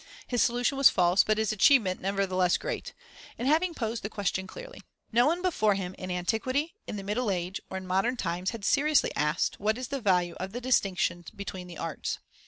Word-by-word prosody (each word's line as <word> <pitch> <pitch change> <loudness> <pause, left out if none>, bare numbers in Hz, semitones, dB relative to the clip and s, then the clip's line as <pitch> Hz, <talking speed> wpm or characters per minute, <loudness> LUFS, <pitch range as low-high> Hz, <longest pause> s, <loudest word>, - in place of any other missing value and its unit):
His 245 -2 0
solution 245 +3 +1
was 275 - +9
false, 180 +1 +4
but 215 0 +1
his 220 -1 +1
achievement 215 -3 +4
nevertheless 185 -2 +1
great, - - -5 0.4
in 240 - -4
having 325 +5 +2
posed 225 -1 -3
the 210 - -4
question 195 -3 -2
clearly. - - -10 0.3
No 240 +3 +4
one 345 +4 0
before 215 - +2
him, 185 -2 -4
in 185 - -7
antiquity, 230 - -1
in - - -4
the 200 - -5
Middle 210 +4 -1
Age, 180 0 -2
or 190 - -4
in 190 - -7
modern 195 +7 +1
times, 180 -1 -2
had 225 -4 -6
seriously 300 +1 +3
asked: 150 0 0
What 215 +3 +1
is 255 -1 -5
the 275 -1 -3
value 180 -4 +2
of 190 +2 -5
the 245 - -3
distinctions 190 -8 0
between 190 -2 -7
the 175 -2 -10
arts? 165 -3 -3
205 Hz, 200 wpm, -28 LUFS, 185-250 Hz, 0.4 s, was